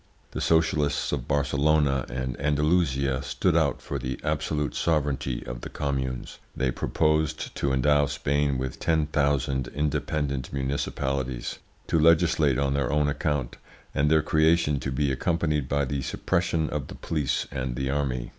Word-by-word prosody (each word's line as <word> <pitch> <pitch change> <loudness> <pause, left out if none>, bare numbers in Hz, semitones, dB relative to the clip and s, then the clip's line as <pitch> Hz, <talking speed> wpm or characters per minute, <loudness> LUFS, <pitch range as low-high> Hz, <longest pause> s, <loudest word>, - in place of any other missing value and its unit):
The - - -4
socialists 75 -3 +2
of 65 -5 -3
Barcelona 70 -1 +2
and 65 0 -3
Andalusia 70 -3 +1
stood - - 0
out - - +1
for - - -4
the 65 +1 -4
absolute 75 -1 -1
sovereignty 70 -6 -1
of - - -6
the - - -6
communes; 65 -3 -3 0.2
they 65 -1 0
proposed 75 +3 0
to 70 - 0
endow 70 +2 +3
Spain 70 -1 0
with 65 0 -4
ten 80 -2 +2
thousand 70 -3 0
independent 70 -1 -2
municipalities, 65 -2 -2 0.3
to 80 - +1
legislate 80 -4 +4
on 70 0 +1
their 70 -3 0
own 75 0 +2
account, 75 -3 -1 0.4
and 75 +1 +2
their 80 -1 +4
creation 80 -2 +3
to 65 - -3
be 70 +1 0
accompanied 75 0 0
by 70 0 +1
the 70 +1 -2
suppression 85 +1 0
of 75 -2 -3
the - - -9
police 75 -5 -1
and 65 -3 -3
the 65 +2 -1
army. 65 -4 -1
70 Hz, 150 wpm, -26 LUFS, 65-75 Hz, 0.4 s, legislate